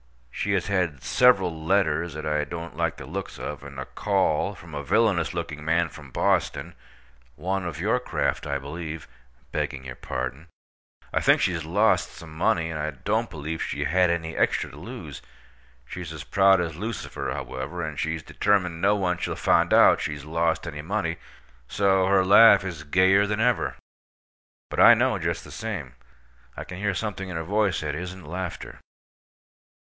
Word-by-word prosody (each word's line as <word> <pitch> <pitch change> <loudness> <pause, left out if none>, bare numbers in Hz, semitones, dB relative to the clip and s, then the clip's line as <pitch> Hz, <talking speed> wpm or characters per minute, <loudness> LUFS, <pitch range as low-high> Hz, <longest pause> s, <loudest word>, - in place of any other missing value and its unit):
She 100 - -1
has 95 -2 +1
had 90 -9 -1
several 90 - +3
letters 85 -3 +1
that 75 - -5
I 75 -1 +1
don't 85 0 -7
like 85 0 -1
the 70 - -8
looks 95 +7 -6
of, 75 - -6
and 70 -1 -9
a 65 - -4
call 100 0 0
from 85 -2 -13
a 75 - -3
villainous 95 -2 +2
looking 75 -3 -4
man 80 +1 +1
from 75 -3 -12
Boston—one 65 +8 -3
of 85 -3 -5
your 110 +8 +1
craft, 125 - -2
I 70 -1 -1
believe 80 +2 -7 0.4
(begging 65 0 -3
your 65 -1 -7
pardon). 65 +6 -5 0.7
I - - +1
think - - +5
she's 85 -3 0
lost 100 +8 +2
some 80 -2 -11
money, 80 0 +1
and 80 - -4
I 75 +1 -1
don't 65 -4 -1
believe 80 +2 -5
she - - -2
had 90 +1 +3
any 80 -1 -2
extra - - +1
to - - -13
lose. - - -8 0.6
She's 85 +5 -7
as 80 -2 -7
proud 95 -1 +4
as 85 -3 -2
Lucifer, 110 +7 -4
however, 70 +7 -5
and 80 -3 -5
she's 80 0 -2
determined 90 -4 0
no 105 - +4
one 90 -3 0
shall - - -2
find - - +2
out - - +6
she's 75 -1 -4
lost 80 +1 0
any 75 -4 -5
money, 85 -1 -2 0.5
so 95 -2 +2
her 95 -1 +4
laugh 105 +2 +8
is 85 -6 -6
gayer 95 +6 +4
than 105 +1 -1
ever. 120 +1 +1 1.0
But - - -3
I - - +9
know, - - +1
just - - -2
the - - -12
same. 90 - -5 0.6
I - - -4
can 90 0 -9
hear 100 -1 0
something 95 -1 -4
in 90 - -5
her 80 - -3
voice 100 0 +1
that 75 -2 -3
isn't 90 +4 -6
laughter. 90 0 -6
85 Hz, 175 wpm, -25 LUFS, 75-95 Hz, 1.0 s, I